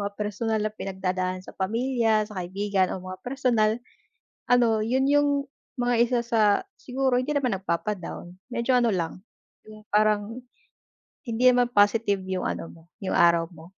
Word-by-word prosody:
mga 200 0 -3
personal 210 +2 -2
na 215 - -2
pinagdadaan 185 -2 -3
sa - - -11
pamilya, 225 +1 +1
sa 210 -3 -7
kaibigan, 190 +1 -1
o 185 - -9
mga 185 0 -7
personal, 245 -4 +1 0.8
ano, 235 -3 +3
yun 260 +4 +1
yung 290 0 +4 0.5
mga 245 0 +1
isa 245 0 0
sa 235 -1 0 0.4
siguro 260 0 0
hindi 255 +4 -1
naman 250 -8 +1
nagpapa-down, 180 -1 -4 0.2
medyo 245 +2 +1
ano 240 -2 +3
lang, 175 0 -3 0.4
yung 215 0 -14
parang 215 +3 +1 0.8
hindi 230 +2 -1
naman 245 -1 +3
positive 205 -1 +3
yung 185 -1 -2
ano - - -3
mo, 165 - -17 0.2
yung - - -1
araw 170 -1 +5
mo. 160 -1 -13
215 Hz, 150 wpm, -25 LUFS, 190-245 Hz, 0.8 s, araw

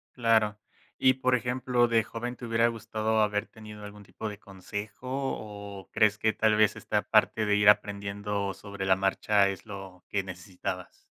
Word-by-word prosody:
Claro, 110 -3 +2 0.4
y, 130 0 +5
por 130 0 +1
ejemplo, 125 0 +1
de 115 -1 +3
joven, 120 +2 -5
¿te - - -10
hubiera 115 0 +2
gustado 110 -1 -1
haber 105 -1 0
tenido 105 -1 -11
algún 105 0 -10
tipo 110 +2 -6
de 105 -1 -8
consejo 105 +4 -8
o, 105 -7 -5
crees 105 -1 +3
que 110 +1 +2
tal 110 -1 +2
vez 110 -1 +4
esta - - -1
parte 110 - +2
de 105 - +3
ir 105 0 +4
aprendiendo 100 -1 +1
sobre 100 -2 -6
la 95 - +5
marcha 100 +1 +2
es 95 -1 -6
lo, 95 -3 -9
que 100 - 0
necesitabas? 90 0 -7
105 Hz, 170 wpm, -28 LUFS, 100-115 Hz, 0.4 s, y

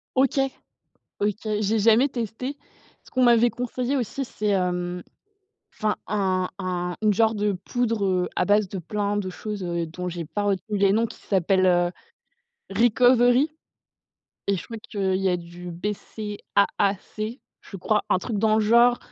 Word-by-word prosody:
OK. 270 +1 +3 0.8
OK, 205 0 +1 0.2
j'ai 215 +2 +1
jamais 230 +6 +5
testé. 250 +3 -4 0.5
Ce - - -19
qu'on 255 - +2
m'avait 240 0 +5
conseillé 250 +2 -2
aussi 270 +2 -2
c'est, 215 -3 -4
hem, 180 -2 0 0.7
enfin 215 -1 0
un 190 -3 0
un 180 -1 -2
une 215 -1 +3
genre 225 +2 +3
de 205 0 +1
poudre, 230 -4 0
heu, 185 -2 +1
à - - +1
base 205 -1 +3
de 195 - -5
plein 205 +4 -2
de 195 -2 -2
choses 205 +1 -5
heu, 170 -1 -2
dont 180 +3 -6
j'ai 170 -1 -4
pas 205 +6 -3
retenu 205 +1 -1
les 195 0 +4
noms 225 +2 +2
qui - - -10
s'appelle 190 -1 +2
heu, 175 -1 +3 0.8
Recovery. 245 +5 +4 1.0
Et 200 - +3
je - - -6
crois 230 - -7
qu'il 195 -3 -1
y 195 0 +1
a 180 - +2
du 175 +1 -9
BCAAC? 210 +3 -2 0.2
Je 195 - -9
crois, 210 +3 +1
un 185 - +4
truc 210 +2 -3
dans 215 0 +3
le - - +3
genre, 235 +3 +5
205 Hz, 165 wpm, -24 LUFS, 185-230 Hz, 1.0 s, jamais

